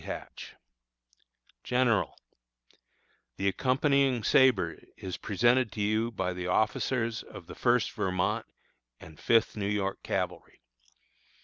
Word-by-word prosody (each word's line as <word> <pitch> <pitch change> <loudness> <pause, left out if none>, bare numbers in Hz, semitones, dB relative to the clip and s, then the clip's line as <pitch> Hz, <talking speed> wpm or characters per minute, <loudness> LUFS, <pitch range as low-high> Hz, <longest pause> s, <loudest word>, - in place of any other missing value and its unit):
Hatch_: - - -8 1.1
GENERAL: 125 -3 +1 1.2
The 100 - -1
accompanying 130 +2 +2
sabre 130 +3 +3 0.2
is 95 -2 -6
presented 120 +4 +2
to 105 - -4
you 110 +3 +1
by 95 -5 -2
the 90 0 -5
officers 115 +3 0
of - - -12
the - - -10
First - - +1
Vermont 90 -1 -1 0.5
and 80 -1 -14
Fifth 115 -1 +2
New 100 -2 -2
York 100 -2 -2
Cavalry. - - -4
110 Hz, 110 wpm, -29 LUFS, 95-125 Hz, 1.2 s, sabre